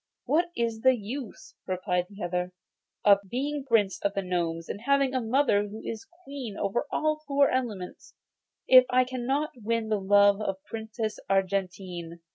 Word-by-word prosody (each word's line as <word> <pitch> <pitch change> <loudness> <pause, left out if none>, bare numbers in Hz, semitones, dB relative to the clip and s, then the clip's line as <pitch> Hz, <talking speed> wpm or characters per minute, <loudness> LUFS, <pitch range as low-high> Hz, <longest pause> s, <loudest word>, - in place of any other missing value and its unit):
'What 345 +3 +2
is 230 -2 -1
the 260 0 +5
use,' 230 +2 -7
replied 180 -1 -1
the 200 -1 -9
other, 180 +1 -2 0.5
'of 200 -1 +7
being 280 +4 -2
Prince 225 -7 +2
of 200 0 -1
the 195 - -1
Gnomes, 170 -2 -2
and 205 - -6
having 275 +1 +2
a 260 - 0
mother 225 -3 +2
who 210 +2 -8
is 225 -1 -6 0.2
queen 270 - -7
over 210 +8 -1
all 310 0 +1
the 305 - -27
four 280 0 +3
elements, 220 -8 -4 0.5
if 255 -1 +8
I 255 0 +4
cannot 260 +4 -2
win 225 0 -1
the 215 -1 +1
love 200 +1 +5
of 195 -2 -1
the 190 - -34
Princess 220 -1 -4
Argentine? 185 -3 -2
220 Hz, 170 wpm, -27 LUFS, 195-255 Hz, 0.5 s, if